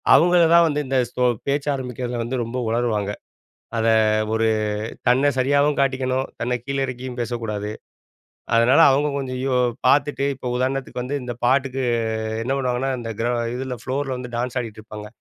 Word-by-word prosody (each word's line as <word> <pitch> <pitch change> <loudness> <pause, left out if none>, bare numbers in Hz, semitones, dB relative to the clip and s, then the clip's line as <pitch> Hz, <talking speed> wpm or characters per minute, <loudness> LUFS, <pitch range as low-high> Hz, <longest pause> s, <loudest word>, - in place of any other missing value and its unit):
அவங்கள 175 +1 +5
தான் 170 - +7
வந்து 150 -2 -1
இந்த 135 0 +1 0.2
ஸோ 125 - -2 0.3
பேச்சு 140 +1 0
ஆரம்பிக்கறதுல 125 -2 -4
வந்து 125 +3 -3
ரொம்ப 115 +3 -5
உலறுவாங்க. 110 -4 0 0.7
அத 115 0 +1 0.5
ஒரு 110 0 +2 0.6
தன்ன 130 +3 +4
சரியாவும் 140 +3 +2
காட்டிக்கணும், 130 -1 0
தன்ன 125 +1 0
கீழ 140 +1 -3
இறக்கியும் 125 0 -6
பேசக்கூடாது. 110 -3 -3 0.9
அதனால 120 +7 +5
அவங்க 145 +2 +2
கொஞ்சம் 130 -2 -3
யோ 135 - 0 0.3
பாத்துட்டு, 145 -1 +3
இப்ப 125 -1 -6
உதாரணத்துக்கு 130 0 -2
வந்து 135 +4 -3
இந்த 120 -1 -5
பாட்டுக்கு 135 +1 +1 0.6
என்ன 130 - -1
பண்ணுவாங்கன்னா, 130 0 -1
இந்த 115 -1 -6
கிர 120 - 0 0.3
இதுல 130 -1 -4
ஃப்ளோர்ல 135 +1 -2
வந்து 125 -1 -7
டான்ஸ் 125 +1 -2
ஆடிட்டுருப்பாங்க. 110 -1 -9
130 Hz, 150 wpm, -22 LUFS, 120-135 Hz, 0.9 s, தான்